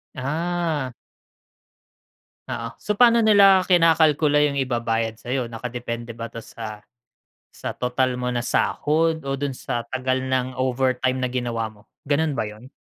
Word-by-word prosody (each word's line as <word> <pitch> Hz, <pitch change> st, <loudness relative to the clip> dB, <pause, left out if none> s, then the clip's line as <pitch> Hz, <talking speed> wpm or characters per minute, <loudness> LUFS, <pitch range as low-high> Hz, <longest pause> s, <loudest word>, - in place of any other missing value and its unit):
Ah. 155 Hz, 0 st, -2 dB, 1.6 s
Oo, -, -, -4 dB
so 210 Hz, -1 st, -2 dB
paano 235 Hz, -1 st, +6 dB
nila 200 Hz, -3 st, +6 dB
kinakalkula 160 Hz, -4 st, +4 dB
yung 140 Hz, -, -4 dB
ibabayad 115 Hz, -3 st, 0 dB
sayo, 125 Hz, +2 st, -3 dB
nakadepende 115 Hz, 0 st, -6 dB
ba 115 Hz, -, -4 dB
'to 115 Hz, 0 st, -8 dB
sa 110 Hz, -2 st, -8 dB, 0.7 s
sa -, -, -6 dB
total 125 Hz, 0 st, 0 dB
mo 125 Hz, 0 st, -2 dB
na 120 Hz, -, -1 dB
sahod 160 Hz, +4 st, 0 dB
o 135 Hz, -, 0 dB
dun 140 Hz, 0 st, -2 dB
sa 120 Hz, -2 st, -4 dB
tagal 130 Hz, 0 st, 0 dB
ng 130 Hz, -1 st, -1 dB
overtime 130 Hz, 0 st, 0 dB
na 130 Hz, -, 0 dB
ginawa 120 Hz, -3 st, -2 dB
mo? 105 Hz, -1 st, -16 dB, 0.3 s
Ganun 150 Hz, +1 st, +2 dB
ba 110 Hz, -6 st, -2 dB
yun? 110 Hz, +5 st, -12 dB
130 Hz, 140 wpm, -23 LUFS, 120-155 Hz, 1.6 s, paano